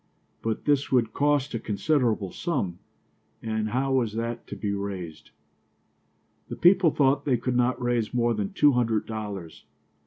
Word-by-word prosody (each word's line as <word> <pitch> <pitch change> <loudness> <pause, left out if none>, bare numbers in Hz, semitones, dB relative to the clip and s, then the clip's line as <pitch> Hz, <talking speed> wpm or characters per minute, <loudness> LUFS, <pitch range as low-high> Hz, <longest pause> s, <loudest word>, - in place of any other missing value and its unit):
But 110 -1 -3
this 145 -2 +1
would 120 -4 +2
cost 145 -1 +1
a 115 - -1
considerable 110 - 0
sum, 95 - -2 0.6
and 110 -1 -2
how 135 +3 0
was 120 -5 +1
that 115 +1 -4
to - - -6
be 100 -1 -2
raised? 95 -5 -6 1.2
The - - -4
people 180 -1 +5
thought 140 -1 +2
they 130 -4 +2
could 125 +2 -2
not 125 +1 +2
raise 120 -3 0
more 120 -1 +1
than 105 -3 -3
two 145 - +4
hundred 115 -4 +1
dollars. 105 -7 -6
115 Hz, 155 wpm, -26 LUFS, 105-135 Hz, 1.2 s, people